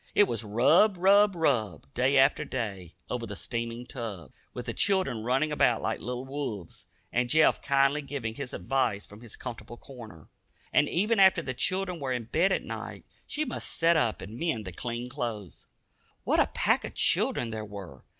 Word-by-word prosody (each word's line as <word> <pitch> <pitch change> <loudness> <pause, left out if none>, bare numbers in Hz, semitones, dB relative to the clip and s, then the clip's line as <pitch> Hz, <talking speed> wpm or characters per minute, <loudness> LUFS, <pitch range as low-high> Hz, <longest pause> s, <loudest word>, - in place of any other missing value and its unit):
It - - +7
was 115 - -1
rub, 155 - +4
rub, 200 +2 +5
rub, 110 - 0
day 130 +3 +2
after 135 +3 +4
day, 100 - -5
over 120 -2 -4
the 105 - -6
steaming 115 +2 -4
tub, 105 - -7 0.2
with - - -7
the - - -3
children 190 - +1
running 135 +6 +1
about 125 -5 +3
like - - -2
little 125 +1 -5
wolves, 130 - -6 0.3
and 125 0 +1
Jeff 155 +2 +4
kindly 140 +2 +2
giving 140 -6 -5
his 130 +1 -6
advice 120 -7 -1
from 105 +2 -14
his 120 -3 -8
comfortable 120 -1 -8
corner. 115 - -12 0.5
And 145 - +4
even 210 +5 +1
after 190 -3 +6
the 130 - -3
children 185 +5 -1
were 135 -3 -2
in 120 -2 -2
bed 165 - +1
at - - 0
night, - - -7 0.2
she 305 +1 -1
must - - -4
sit 170 0 +3
up 120 -7 +1
and 110 +5 -9
mend 130 -11 -1
the 95 - -5
clean 120 +6 -4
clothes. 110 -7 -6 0.6
What - - +2
a - - +4
pack - - +1
of - - -7
children 115 - +2
there 110 -1 -4
were! 100 - -10
125 Hz, 185 wpm, -28 LUFS, 110-150 Hz, 0.6 s, It